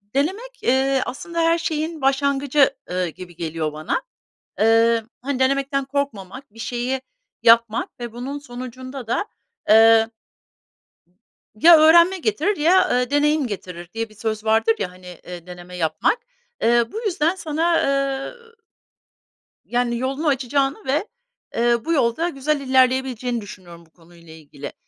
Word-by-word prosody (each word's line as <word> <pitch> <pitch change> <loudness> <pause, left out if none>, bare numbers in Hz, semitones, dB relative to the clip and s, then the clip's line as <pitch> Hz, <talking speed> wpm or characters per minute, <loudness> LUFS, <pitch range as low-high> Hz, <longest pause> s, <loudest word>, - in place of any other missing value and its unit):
denemek, 405 - -2
eee, 265 +1 +2
aslında 335 +5 -5
her 330 0 +3
şeyin 315 -1 -3
başlangıcı, 275 +1 +2 0.2
ııı, 180 0 -1
gibi 175 +1 -10
geliyor 160 -2 -3
bana. 155 +1 -2 0.6
Iıı, 225 +1 +3
hani, 275 0 -2
denemekten 275 +1 +1
korkmamak, 265 -4 -5
bir - - -16
şeyi 245 +3 -2 0.4
yapmak 230 0 +3
ve 240 -2 -6
bunun 255 +5 -5
sonucunda 255 -1 -8
da, 240 - -1 0.4
eee, 225 +1 +6 1.5
“Ya 330 +10 +7
öğrenme 340 +4 +6
getirir 415 +1 0
ya, 350 +5 +4
ııı, 250 0 +1
deneyim 295 0 +2
getirir” 180 -5 -7
diye 225 0 -3
bir 215 - -19
söz 215 0 -4
vardır 225 +1 +3
ya, 180 - -3
hani, 180 0 -16 0.2
eee, 175 -1 -9
deneme 180 0 -10
yapmak. 165 - 0 0.4
Eee, 235 +1 +4
bu 440 - -4
yüzden 345 -3 +1
sana, 330 -1 0
eee 275 -1 -1 1.3
yani, 240 -1 -1
yolunu 270 +5 -2
açacağını 275 0 0
ve, 295 +10 0 0.5
eee, 235 0 +1
bu 335 - 0
yolda 290 +4 +1
güzel 295 0 -1
ilerleyebileceğini 255 -2 +1
düşünüyorum 175 -4 -12
bu - - -28
konuyla 170 -1 -17
ilgili. 145 -3 -10
255 Hz, 135 wpm, -21 LUFS, 220-285 Hz, 1.5 s, Ya